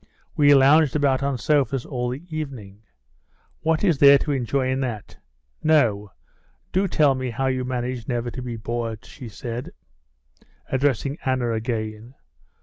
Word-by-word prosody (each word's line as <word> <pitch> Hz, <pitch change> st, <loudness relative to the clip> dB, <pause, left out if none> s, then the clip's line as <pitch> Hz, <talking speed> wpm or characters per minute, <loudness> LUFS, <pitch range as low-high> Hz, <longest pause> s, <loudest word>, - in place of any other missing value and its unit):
We 145 Hz, -1 st, +6 dB
lounged 140 Hz, +1 st, +5 dB
about 140 Hz, -3 st, +2 dB
on 140 Hz, -1 st, -1 dB
sofas 135 Hz, -1 st, +1 dB
all 125 Hz, -3 st, -3 dB
the 130 Hz, +6 st, -6 dB
evening. 115 Hz, -10 st, -7 dB, 0.8 s
What 160 Hz, +2 st, 0 dB
is 170 Hz, -8 st, +2 dB
there 140 Hz, 0 st, +8 dB
to 150 Hz, -, -3 dB
enjoy 130 Hz, 0 st, 0 dB
in 130 Hz, -, -1 dB
that? 120 Hz, -6 st, -5 dB, 0.4 s
No; 115 Hz, -10 st, +2 dB, 0.6 s
do 195 Hz, +2 st, +1 dB
tell 150 Hz, -5 st, +3 dB
me 130 Hz, -1 st, -3 dB
how 135 Hz, +3 st, -2 dB
you 130 Hz, -1 st, 0 dB
manage 125 Hz, -1 st, -4 dB
never 120 Hz, -1 st, -2 dB
to 130 Hz, -, -7 dB
be 125 Hz, -2 st, -5 dB
bored?" 115 Hz, 0 st, -4 dB
she 125 Hz, -5 st, -10 dB
said, 120 Hz, +3 st, -6 dB, 1.0 s
addressing 140 Hz, +2 st, 0 dB
Anna 130 Hz, -3 st, 0 dB
again. 110 Hz, +1 st, -4 dB
130 Hz, 145 wpm, -23 LUFS, 120-140 Hz, 1.0 s, there